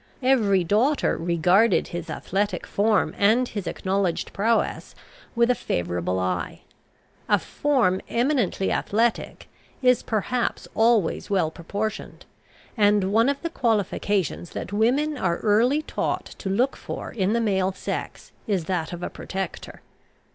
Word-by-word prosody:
Every 215 -8 +3
daughter 225 - +2
regarded 175 +6 +2
his 175 -1 -6
athletic 200 +2 -2
form 210 0 +1
and 225 +5 +4
his 205 -5 -5
acknowledged 190 -2 -1
prowess 225 +3 0 0.4
with 235 +1 +4
a - - +4
favourable 90 - -2
eye. 90 -1 -2 0.7
A - - +5
form 245 -11 +1
eminently 240 -6 +1
athletic 225 +3 -1 0.4
is, 250 -1 +4
perhaps, 235 +3 -2
always 225 -6 +2
well 185 -6 +1
proportioned; 205 +6 -5 0.5
and 205 -3 +3
one 230 +4 +4
of 280 +2 -2
the 335 - -2
qualifications 205 - 0
that - - -6
women 265 +7 +1
are 170 -2 0
early 240 +8 +2
taught - - -2
to 195 - -4
look 245 +8 +1
for - - -7
in 205 -3 0
the 235 - +2
male 195 -4 +1
sex, 190 - -6 0.2
is 190 -6 0
that 175 -2 -2
of 175 0 -6
a - - -2
protector. 190 -2 -6
205 Hz, 135 wpm, -24 LUFS, 185-235 Hz, 0.7 s, A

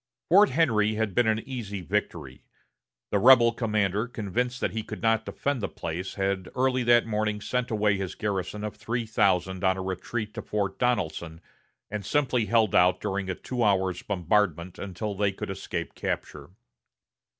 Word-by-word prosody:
Fort 200 +5 +7
Henry 110 -8 +2
had 110 -2 -1
been 120 +4 +3
an 110 +2 0
easy 105 -7 -5
victory. 85 - -3 0.7
The 100 - +2
rebel 120 +1 +7
commander, 105 -2 0
convinced 120 +2 -2
that - - -1
he 110 - -3
could - - -8
not 115 -1 +2
defend 140 -4 -2
the - - -2
place, 85 +3 -5
had 95 -2 -1
early 130 0 +2
that 120 0 +5
morning 105 -1 -1
sent 125 +3 -2
away 105 -2 +2
his 95 -2 -4
garrison 105 0 -3
of 105 -1 -4
three 115 +2 -3
thousand 95 -4 +1
on 95 0 +3
a 95 - -4
retreat 105 +4 -4
to - - -5
Fort 100 -2 -2
Donelson, 85 -9 -1 0.5
and 105 -1 -3
simply 125 0 +1
held 115 -4 +3
out 90 +1 +4
during 100 -2 -3
a 95 - -1
two 125 +4 -3
hours' 95 -3 +1
bombardment 90 -2 0
until 100 +2 -4
they 100 0 +1
could 95 - -6
escape 95 - -5
capture. 70 0 -4
105 Hz, 170 wpm, -27 LUFS, 95-115 Hz, 0.7 s, Fort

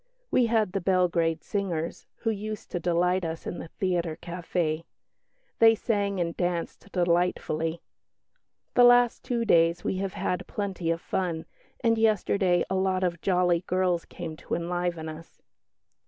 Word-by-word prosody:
We 245 -2 +4
had 220 -4 +2
the 195 - -2
Belgrade 170 -3 +1
singers, 175 -5 -3
who 225 - -1
used 215 0 -6
to 175 - -1
delight 180 +2 +1
us 165 0 -4
in 175 - -4
the - - -7
theatre 170 -2 -1
café. 170 -2 -2 0.8
They 225 0 +7
sang 200 -3 -1
and 170 -1 -1
danced 175 +2 -3
delightfully. 170 -2 0 0.9
The 245 - +6
last 245 0 +5
two 235 -2 -1
days 170 -3 +4
we 190 - -1
have 195 0 -2
had 180 - -2
plenty 190 -5 -3
of 165 0 0
fun, 170 -4 -2 0.4
and 230 -1 +3
yesterday 200 -4 +2
a - - -3
lot 190 0 +1
of 175 -2 -1
jolly 180 -2 +2
girls 180 -2 +1
came 165 -3 -7
to - - -3
enliven 175 -1 -2
us." 160 +1 -10
180 Hz, 150 wpm, -27 LUFS, 170-200 Hz, 0.9 s, They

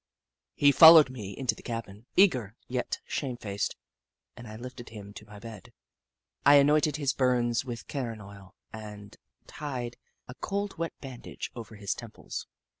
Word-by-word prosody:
He 145 0 +5
followed 160 -2 +9
me 105 -6 -7
into 130 -2 +1
the - - -13
cabin, 115 -1 -6
eager, 125 - +4
yet 125 0 -2
shamefaced, 120 -7 -3 0.6
and 120 -1 -10
I 110 - -8
lifted 120 +1 -9
him 100 -2 -10
to 105 - -11
my 105 0 -12
bed. 110 -2 -11 0.7
I 145 - +8
anointed 150 +1 +4
his 140 -3 0
burns 125 -2 +1
with 120 -2 -6
carron 120 -6 -4
oil 100 -1 -13 0.2
and 105 -2 -9 0.3
tied 125 -5 -5 0.3
a 125 - -8
cold 200 +4 -4
wet 165 0 -2
bandage 130 -3 -7
over 115 -2 -9
his 100 -1 -2
temples. 115 -3 -8
120 Hz, 150 wpm, -29 LUFS, 105-140 Hz, 0.7 s, followed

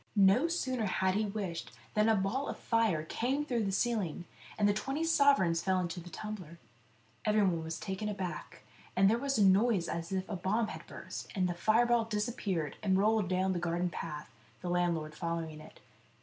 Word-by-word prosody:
No 200 +9 +5
sooner 260 -10 -1
had 190 0 +1
he 210 +2 +1
wished 195 -5 -4 0.2
than 215 +1 +3
a 220 - +5
ball 210 +8 -1
of - - -4
fire 225 -9 +1
came 260 - -1
through 240 -6 0
the 195 - 0
ceiling, 195 -6 -1 0.3
and 205 - +3
the 205 - +4
twenty 270 +9 -2
sovereigns 280 - +4
fell 190 0 +1
into 175 0 -3
the 175 +1 -10
tumbler. 185 -5 -7 0.7
Everyone 195 -6 +2
was 160 0 -5
taken 195 +2 -3
aback, 190 -4 -5 0.3
and 195 +1 +5
there 225 +3 +3
was 275 +1 0
a 205 - +5
noise 195 -1 +4
as 170 +1 -4
if 190 0 -1
a 205 - -3
bomb 210 +5 0
had - - -8
burst, - - -7
and 185 -2 +2
the 175 - -1
fireball 230 +5 +3
disappeared, 210 - -2
and 190 -3 +2
rolled 210 -1 +2
down 185 +1 +1
the 175 - -1
garden 175 +1 -1
path, 150 -5 -6 0.4
the 175 - -2
landlord 170 -3 0
following 165 -2 -4
it. 155 - -14
195 Hz, 190 wpm, -32 LUFS, 175-220 Hz, 0.7 s, No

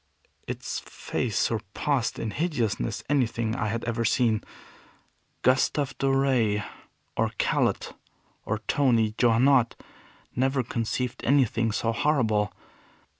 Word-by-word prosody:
Its - - -4
face 115 -4 -3
surpassed 115 +4 0
in 115 - -3
hideousness 120 - -1
anything 120 -5 0
I 110 - -1
had 115 +2 -2
ever 115 0 -1
seen. 115 -1 +2 1.0
Gustav 130 +1 +2
Doré, 130 -6 +2 0.5
or - - +1
Callot, - - 0 0.5
or - - -2
Tony 115 -6 +2
Johannot, 120 +1 +4 0.6
never 130 +1 +1
conceived 115 +2 -3
anything 120 -4 +2
so 115 +1 0
horrible. 110 -7 +1
120 Hz, 100 wpm, -26 LUFS, 110-135 Hz, 1.0 s, Johannot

